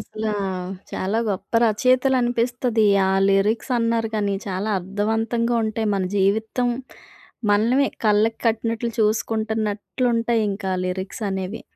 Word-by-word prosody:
అసలా 215 0 -4 0.6
చాలా 200 +4 -1
గొప్ప 195 -3 -4
రచయితలనిపిస్తది. 245 0 +2 0.2
ఆ - - +2 0.2
లిరిక్సన్నారు 225 +3 +1
గానీ 205 -2 0
చాలా 195 +2 -2
అర్థవంతంగా 225 +5 -1
ఉంటాయి. 220 0 -1
మన 195 - 0
జీవితం 220 +5 +1 0.8
మనమే 235 +7 +3 0.2
కళ్ళకి 215 +2 +3
కట్టినట్లు 230 +1 0
చూసుకుంటున్నట్లుంటాయి 220 +2 0
ఇంకా 195 -1 -3
లిరిక్సనేవి. 190 +2 -4
220 Hz, 90 wpm, -22 LUFS, 205-230 Hz, 0.8 s, మనమే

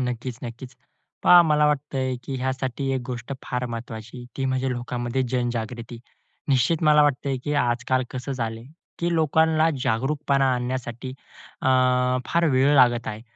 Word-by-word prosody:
नक्कीच 125 0 -5
नक्कीच. 125 +2 -8 0.5
पहा 175 0 +8
मला 150 -2 +3
वाटतंय 135 -3 -1
की 135 - -4
ह्यासाठी 130 +1 -2
एक 130 - -1
गोष्ट 125 0 -5
फार 125 -1 -3
महत्वाची 115 0 -7
ती 135 - -2
म्हणजे 130 0 0
लोकांमध्ये 120 +1 -2
जनजागृती. 120 -1 -3 0.5
निश्चित 135 +5 +2
मला 150 -1 +6
वाटतंय 140 -1 0
की 145 - -1
आजकाल 125 +2 0
कसं 130 +2 -5
झालंय, 115 -3 -4 0.3
की 170 0 0
लोकांना 160 0 +3
जागरूकपणा 135 +4 +1
आणण्यासाठी, 125 0 -4 0.5
अ, - - -1 0.6
फार 170 0 +1
वेळ 135 +3 +4
लागत 120 -3 +4
आहे. 110 +1 -6
130 Hz, 140 wpm, -24 LUFS, 120-140 Hz, 0.6 s, पहा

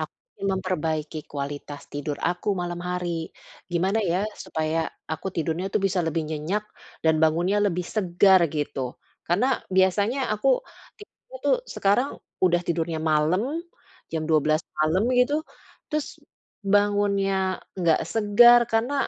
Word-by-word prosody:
aku - - -5 0.4
memperbaiki 160 -5 -2
kualitas 145 0 -5
tidur 145 0 -3
aku 175 +4 -1
malam 175 0 -4
hari. 175 -2 -3 0.4
Gimana 190 +5 +1
ya 180 0 +1 0.2
supaya 160 +1 -1 0.3
aku 160 - -5
tidurnya 165 +3 -1
itu - - +1
bisa 190 -1 0
lebih 160 0 0
nyenyak 160 +7 -2 0.4
dan 160 0 +5
bangunnya 175 +6 +3
lebih 180 -2 -1
segar 190 -1 +4
gitu? 140 -4 -3 0.3
Karena 190 +9 +2 0.3
biasanya 200 +7 +3
aku 215 - 0 0.5
tipe, 450 +4 -17
tuh, - - +4
sekarang 245 +8 +1 0.3
udah 175 -1 +4
tidurnya 165 -1 -1
malam, 155 +4 +2 0.7
jam 160 -1 -1
12:00 155 0 +3 0.2
malam 155 +5 +2 0.2
gitu. 250 +4 +3 0.6
Terus 305 -2 -1 0.7
bangunnya 205 -1 +2 0.5
nggak 170 -3 +3
segar. 225 +3 +7
Karena 230 +5 +1
175 Hz, 125 wpm, -25 LUFS, 160-205 Hz, 0.7 s, segar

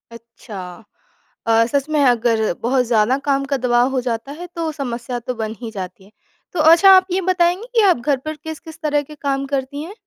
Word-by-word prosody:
अच्छा! 230 -3 -11 0.9
अ, 230 - +3 0.2
सच 280 +1 0
में 290 - +3
अगर 230 -1 +1 0.2
बहुत 255 +2 +2
ज़्यादा 230 +2 +2
काम 275 -1 +2
का 275 - +2
दबाव 245 0 +2
हो - - +2
जाता 240 +2 -4
है, 355 - -7
तो 330 -1 -2
समस्या 245 -4 -4
तो 250 +2 -4
बन 220 0 -4
ही 230 -2 -6
जाती 190 -2 -7
है। 200 - -21 0.4
तो 345 - -3
अच्छा, 340 +4 +7
आप 375 -1 +6
ये 375 +2 +1
बताएँगी 360 +5 +1
कि 455 - +5
आप 355 - +3
घर 265 +3 0
पर 310 0 -4
किस-किस 315 +1 -9
तरह 295 -1 +1
के 300 - -9
काम 275 0 0
करती 275 +2 -3
हैं। 355 +5 -9
270 Hz, 210 wpm, -19 LUFS, 235-315 Hz, 0.9 s, अच्छा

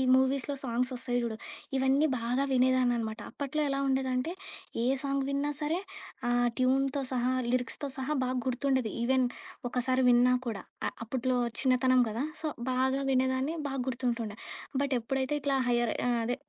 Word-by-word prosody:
మూవీస్‌లో 270 +2 +2
సాంగ్సొస్తాయి 245 0 -1
చూడు, 220 -2 -3 0.4
ఇవన్నీ 270 +4 +3
బాగా 245 +4 0
వినేదాన్ననమాట. 245 -3 +2
అప్పట్లో 285 +2 -2
ఎలా 275 0 0
ఉండేదంటే, 265 +3 0 0.5
ఏ - - +1 0.2
సాంగ్ 275 0 0
విన్నా 280 +1 0
సరే, 315 +4 0 0.5
ఆ - - +2 0.3
ట్యూన్‌తో 270 +2 +2
సహా, 250 0 +1 0.2
లిరిక్స్‌తో 255 +3 -1
సహా 265 +3 -1
బాగా 255 0 -1
గుర్తుండేది. 260 -2 +1
ఈవెన్ 260 +1 +3 0.4
ఒకసారి 255 +1 +1
విన్నా 245 +1 +5
కూడా. 220 -4 -3 0.3
అ - - +1 0.2
అప్పట్లో 255 +1 0 0.2
చిన్నతనం 255 -1 +4
కదా 230 +6 -2 0.2
సో, 315 - -1 0.2
బాగా 265 +2 +1
వినేదాన్ని. 260 +4 +1
బాగా 270 -2 -2
గుర్తుంటుండే. 235 -4 -2 0.4
బటెప్పుడైతే 265 0 0
ఇట్లా 275 -1 +1
హైయర్ 240 -2 +2 0.2
ఆహ్, 240 - +2
అదే 245 +2 0
255 Hz, 140 wpm, -30 LUFS, 245-270 Hz, 0.5 s, విన్నా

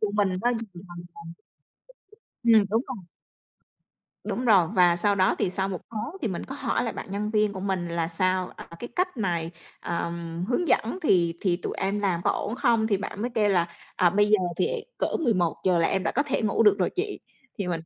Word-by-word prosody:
của 215 - 0
mình 205 -2 +3
nó 240 - +3
hình 245 - 0 0.3
thành 175 0 -9 1.4
dần." 235 -1 +5
Ừm, - - +2
đúng 225 +2 +3
rồi. 235 -8 -6 1.2
Đúng 250 - -3
rồi, 195 -8 +5
và 175 -2 +5
sau 200 +3 +2
đó, 185 -1 +3
thì - - +1
sau 190 +1 -1
1 185 -3 -4
tháng 230 - -5
thì 230 - 0
mình 175 - -4
có 270 - -7
hỏi 245 -3 -1
lại 230 - -2
bạn - - -7
nhân 205 +2 -2
viên 210 -1 +2
của 190 - -6
mình 190 -3 -2
là 170 -1 -1
"Sao, 185 +2 +1
à, - - -9
cái 240 - -6
cách 365 -2 0
này, 170 -6 -1 0.3
ờ, 170 0 -2 0.4
hướng 330 +7 0
dẫn 235 +12 +1
thì 170 - +3
thì 180 -3 +1
tụi 180 - -5
em 200 +2 -1
làm 185 -4 0
có - - +4
ổn 225 - -2
không?". 235 -4 +2
Thì 210 -2 +2
bạn 200 +1 -6
mới 245 - -1
kêu 210 -2 +3
là 175 -3 +2 0.3
"À, 180 -1 +4
bây 205 +3 +3
giờ 215 - +6 0.2
thì - - +2 0.3
cỡ - - +2 0.2
11:00 180 - +1
là 165 - +3
em 190 - 0
đã - - -1
có 285 - +2
thể 280 -5 -1
ngủ 215 +1 +2
được 210 -2 +6
rồi 180 - +1
chị." 405 +3 -3 0.4
Thì 200 - -2
mình 170 -2 -1
200 Hz, 225 wpm, -26 LUFS, 180-225 Hz, 1.4 s, giờ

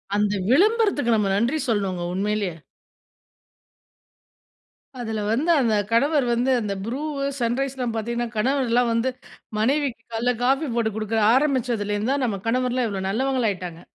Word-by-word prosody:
அந்த 205 0 +1 0.2
விளம்பரத்துக்கு 390 - +3
நம்ம 210 -2 +1
நன்றி 240 +9 +1
சொல்லணுங்க 195 -5 -1
உண்மையிலேயே. 200 -3 -1 2.4
அதுல 220 -3 -3
வந்து 290 +9 0
அந்த 230 -3 +2 0.2
கணவர் 280 +4 +3
வந்து 245 +3 +1
அந்த 205 -2 -2
புரூ, 250 +5 -3 0.4
சன்ரைஸ்லாம் 250 0 -1
பாத்தீங்கன்னா 235 +2 -2
கணவர்லாம் 245 0 +2
வந்து, 230 +3 +1 0.5
மனைவிக்கு 265 +1 0
காலைல 240 +2 +1
காபி 270 +4 +2
போட்டு 230 -2 +1
குடுக்க 220 +1 -2 0.2
ஆரம்பிச்சதுலருந்து 240 -5 0
தான் 280 - -1
நம்ம 205 -5 -2
கணவர்லாம் 250 0 +1
இவ்ளோ 195 -2 -4
நல்லவங்களாயிட்டாங்க. 210 -8 -1
235 Hz, 120 wpm, -23 LUFS, 215-265 Hz, 2.4 s, விளம்பரத்துக்கு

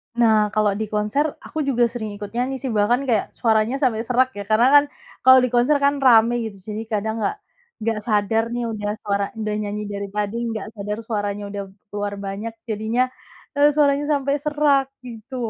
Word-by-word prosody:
Nah 220 -3 +4
kalau 215 -1 +2
di 220 - -1
konser 210 +8 0 0.2
aku 315 - -5
juga 245 -3 +2
sering 220 -4 -5
ikut 205 -1 -8
nyanyi 250 +3 -1
sih 260 -3 -2
bahkan 220 +5 +2
kayak 220 -4 0
suaranya 225 +1 +2
sampai 225 -3 +2
serak 255 +1 +3
ya 200 - -4
karena 220 +3 +4
kan 290 - +8 0.4
kalau 260 0 +9
di 255 - +1
konser 245 +5 +3
kan 280 0 +3
rame 235 -3 +5
gitu 200 -2 -10
jadi 215 +1 -4
kadang 220 +1 -1
nggak 415 - 0 0.5
nggak 225 -1 0
sadar 215 +1 +2
nih 240 0 -2
udah 205 -1 -3
suara 200 -1 0 0.2
udah 215 -1 -2
nyanyi 210 0 -4
dari 200 0 -4
tadi 210 +1 -1
nggak 220 -2 -4
sadar 210 0 -4
suaranya 205 -2 -2
udah 200 -1 -4 0.3
keluar 205 0 -2
banyak 205 +4 -5 0.2
jadinya, 220 +3 0 0.6
eee, 290 +1 +6
suaranya 290 -1 +3
sampai 280 0 0
serak 295 -2 +2 0.2
gitu. 240 +2 -9
220 Hz, 185 wpm, -22 LUFS, 210-255 Hz, 0.6 s, kalau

